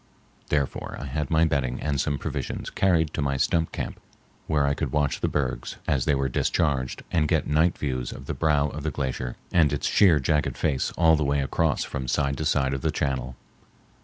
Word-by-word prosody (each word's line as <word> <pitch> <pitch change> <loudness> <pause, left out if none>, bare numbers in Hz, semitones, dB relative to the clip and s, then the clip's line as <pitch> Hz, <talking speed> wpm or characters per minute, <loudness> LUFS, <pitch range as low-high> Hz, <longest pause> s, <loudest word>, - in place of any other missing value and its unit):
Therefore 75 -3 -1
I - - -5
had 75 +1 -3
my 80 0 +4
bedding 70 -5 0
and 70 -2 0
some 70 -1 -1
provisions 70 -3 -4
carried 80 -5 +2
to - - -2
my 70 -1 0
stump 80 +4 +1
camp, - - -5 0.5
where 75 -2 +2
I 70 - +2
could 70 -3 -3
watch 75 -1 0
the - - +2
bergs - - -2
as 65 -3 +1
they 70 - +3
were 70 0 0
discharged 65 0 0
and 75 -3 +2
get - - +1
night 80 +4 +2
views 65 -4 -2
of 65 - -9
the - - -3
brow 75 -2 +2
of 75 - -6
the 80 - -1
glacier 65 -3 -3 0.2
and 80 -5 +4
its 75 - -2
sheer 90 -7 +5
jagged 75 +2 0
face 70 -5 0
all 80 -1 +5
the 75 - 0
way 70 0 +1
across 70 +2 +1
from 65 -1 -5
side 70 +2 +1
to 80 - -2
side 70 -3 +2
of 65 - -3
the - - 0
channel. 65 -2 -2
70 Hz, 210 wpm, -26 LUFS, 65-80 Hz, 0.5 s, sheer